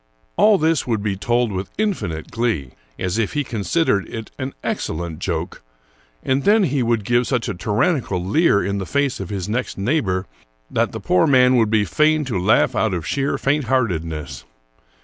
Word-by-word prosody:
All 210 -1 +5
this 160 -3 +1
would 110 -4 -1
be 105 -2 -1
told 120 +3 0
with 95 0 -4
infinite 170 - -2
glee, 110 - -1 0.3
as 95 +4 -2
if 110 - -1
he 145 - 0
considered 110 - 0
it 110 -1 -7
an 130 0 -4
excellent 80 -1 -3
joke, 85 -1 -3 0.6
and 130 +1 0
then 210 +1 +4
he 145 -6 +1
would 115 -3 0
give 120 +2 +2
such 125 -4 -1
a - - -2
tyran 115 - +1
nical 90 -5 -4
leer 105 - +3
in 100 0 -1
the 95 - -5
face 140 -2 0
of 95 - -5
his 95 -3 -4
next 120 +4 -3
neighbor 100 -5 0 0.5
that - - +1
the - - -6
poor 90 - +2
man 130 -2 +5
would 115 -3 +3
be 105 -1 +2
fain 155 - +2
to 115 -8 -2
laugh 95 +5 +3
out 110 -4 +1
of 85 - -4
sheer 140 0 -1
faint 145 0 0
heartedness. 85 - -2
115 Hz, 190 wpm, -21 LUFS, 95-135 Hz, 0.6 s, All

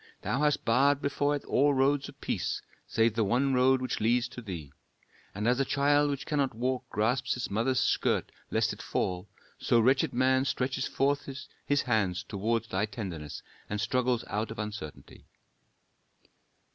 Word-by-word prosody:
Thou 135 - 0
hast 150 -1 +1
barred 135 +4 +4
before 145 +1 0
it 145 - -6
all 140 +2 +3
roads 140 +1 +2
of - - -15
peace, - - -2 0.2
save 115 0 +2
the 115 0 +1
one 125 +6 +2
road 130 +1 +4
which 130 - -2
leads 120 +2 +2
to 125 0 -8
Thee. 85 - -7 0.6
And 105 +3 -1
as 125 +2 +3
a - - +4
child 145 +2 +3
which 140 -2 -3
cannot 140 -5 0
walk 125 +2 -2
grasps 120 +5 0
its 125 - -4
mother's 120 +5 +1
skirt - - +1 0.2
lest - - +1
it - - -9
fall, 90 +1 -2 0.3
so 120 - +3
wretched 130 +4 +3
man 130 +2 +2
stretches 130 0 -1
forth 140 +1 0 0.4
his 145 0 +3
hands 100 -7 0
toward 110 +3 -1
Thy 100 -1 -1
tenderness, 90 - -6 0.3
and 105 - -2
struggles 125 +2 +1
out 105 +2 -2
of 115 - -7
uncertainty." 105 -8 -7
125 Hz, 165 wpm, -29 LUFS, 105-135 Hz, 0.6 s, barred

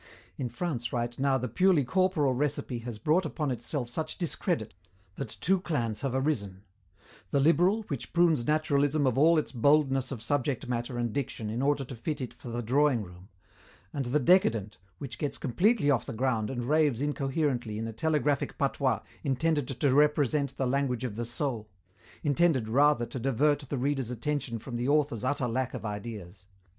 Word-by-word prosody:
In 125 +3 -3
France 125 -7 -3
right 120 0 -2
now 135 -1 +2
the 125 0 -3
purely 175 - +3
corporal 180 -3 +2
recipe 135 -2 -2
has 115 -2 -6
brought 155 - +2
upon 150 -6 -2
itself 120 +2 -3
such 155 +6 -4
discredit 170 - -1 0.4
that 125 +1 -7
two 190 +3 +3
clans 115 - -2
have 135 -2 -2
arisen: 105 -9 -1 0.7
the 140 - +1
liberal, 175 +9 +3
which 135 - -6
prunes 165 -8 +3
naturalism 145 -1 +2
of 130 -3 +2
all 160 +4 +5
its 155 - -1
boldness 135 0 +2
of 115 -5 -5
subject 135 0 -1
matter 120 0 -3
and 120 -2 -1
diction 115 -5 -3
in 115 +3 -2
order 140 0 +1
to 125 - -8
fit 145 +7 -4
it 130 -3 -5
for 125 - -10
the 120 +1 -3
drawing 130 0 +2
room, 90 +1 -13 0.6
and 140 -2 -2
the 130 +5 +1
decadent, 115 - +3 0.2
which 135 +4 -7
gets 145 -3 -2
completely 175 - +2
off 130 - 0
the - - -4
ground 115 -2 0
and 125 -2 -3
raves 150 -3 +2
incoherently 135 -5 -1
in 110 - -3
a 115 - -5
telegraphic 150 +2 0
patois - - 0 0.2
intended 145 +1 0
to 135 +1 0
represent 145 -1 +2
the 135 - 0
language 130 -2 0
of 120 -5 -3
the 120 +1 -3
soul 120 -3 -3 0.5
intended 145 -5 +2
rather 140 +1 +3
to 130 - -6
divert 135 +4 +2
the 140 - -2
reader's 135 -1 -1
attention 125 0 -2
from 120 +2 -6
the 120 +3 -1
author's 145 -7 +1
utter 130 -1 0
lack 130 +2 -2
of - - -6
ideas. 105 -3 -7
135 Hz, 180 wpm, -29 LUFS, 120-150 Hz, 0.7 s, all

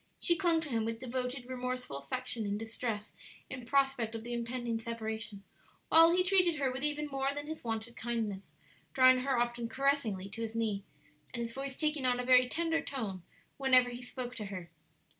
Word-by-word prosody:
She 345 - +3
clung 340 -3 +2
to 310 - -6
him 225 -3 0
with 225 +1 -2
devoted, 250 0 -3
remorseful 250 - -4
affection 230 - -2
and 200 0 -1
distress 225 -1 -4 0.4
in 255 -2 -7
prospect 270 -5 +1
of 225 - -5
the 240 +1 -5
impending 235 -1 -2
separation, 220 -3 -5 0.5
while 330 +1 +9
he 365 +1 +3
treated 365 -3 +4
her 275 -3 0
with 260 +1 -4
even 295 +1 0
more 275 -1 -1
than 290 0 -4
his 315 +1 -6
wonted 225 0 -3
kindness, 215 -7 -3 0.4
drawing 255 -1 +7
her 265 0 0
often 240 -1 -1
caressingly 260 -9 0
to 230 - -6
his 225 0 -4
knee, 215 -3 -1 0.5
and 235 - -2
his 235 0 -5
voice 270 0 -4
taking 300 -4 +1
on 250 0 +2
a 250 - -2
very 250 0 +6
tender 325 +1 0
tone 210 -9 -4 0.4
whenever 255 -2 +5
he 245 0 -7
spoke 245 0 -5
to 210 - -3
her. 185 -4 -7
250 Hz, 190 wpm, -32 LUFS, 225-275 Hz, 0.5 s, while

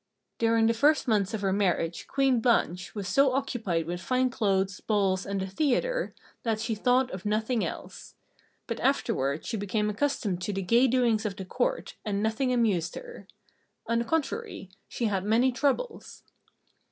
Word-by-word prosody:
During 230 -1 +3
the 230 - +4
first 290 +6 +3
months 205 -4 +2
of 210 - -4
her 195 -1 +1
marriage 180 -4 0
Queen 270 -3 +2
Blanche 200 -7 +1
was 200 -3 -4
so 270 +8 +3
occupied 225 -11 -1
with 175 +2 -4
fine 255 +3 +1
clothes, 195 -4 0
balls, 195 -3 0
and 200 0 -2
the 190 - -2
theatre, 305 - 0 0.3
that 225 -2 -1
she 225 +1 -1
thought 250 +4 +2
of 185 0 -6
nothing 220 +2 0
else. 170 - -7 0.5
But - - -4
afterward 140 +3 0
she 225 - -2
became 210 +1 -1
accustomed 210 -6 -1
to 205 - -2
the 195 0 -2
gay 235 +7 +4
doings 235 -3 +2
of 210 -3 -3
the 190 - -7
Court, - - -2
and 205 -1 -1
nothing 225 +4 0
amused 210 -9 +1
her. 485 -1 -9 0.6
On 230 0 +1
the 235 - -1
contrary, 325 - -3 0.2
she 235 - -3
had 195 -3 0
many 230 +5 +3
troubles. 290 - -2
220 Hz, 170 wpm, -28 LUFS, 195-255 Hz, 0.6 s, the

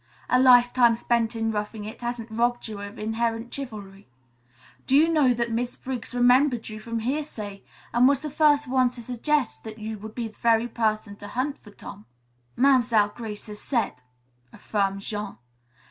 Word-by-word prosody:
"A 250 - +5
lifetime 245 -2 +6
spent 235 0 0
in 225 0 -1
roughing 210 0 -4
it 215 - -9
hasn't 240 -1 -4
robbed 240 +2 0
you 210 -2 -7
of 205 0 -8
inherent 225 +2 -2
chivalry. 205 -7 -8 0.8
Did 265 - +3
you 310 +3 +6
know 305 -6 +3
that 235 0 -1
Miss 240 +2 -2
Briggs 250 -2 -6
remembered 245 0 +3
you 215 0 -7
from 230 +1 -4
hearsay 225 -6 -4 0.3
and 240 +2 +5
was 280 0 +2
the 300 - -4
first 295 -1 +3
one 255 -1 +3
to 245 -1 -10
suggest 250 +2 -1
that 220 -1 -8
you 215 -1 -6
would 215 +1 -9
be 235 -2 -3
the 215 - -15
very 230 0 +3
person 215 -3 -1
to 205 - -9
hunt 260 +6 -2
for - - -15
Tom?" 115 - -11 0.5
"Mam'selle 245 -6 +4
Grace 210 -1 -8
has 210 -1 -8
said," 240 -5 -1 0.5
affirmed 195 -2 -2
Jean. 210 0 -5
230 Hz, 175 wpm, -25 LUFS, 215-250 Hz, 0.8 s, lifetime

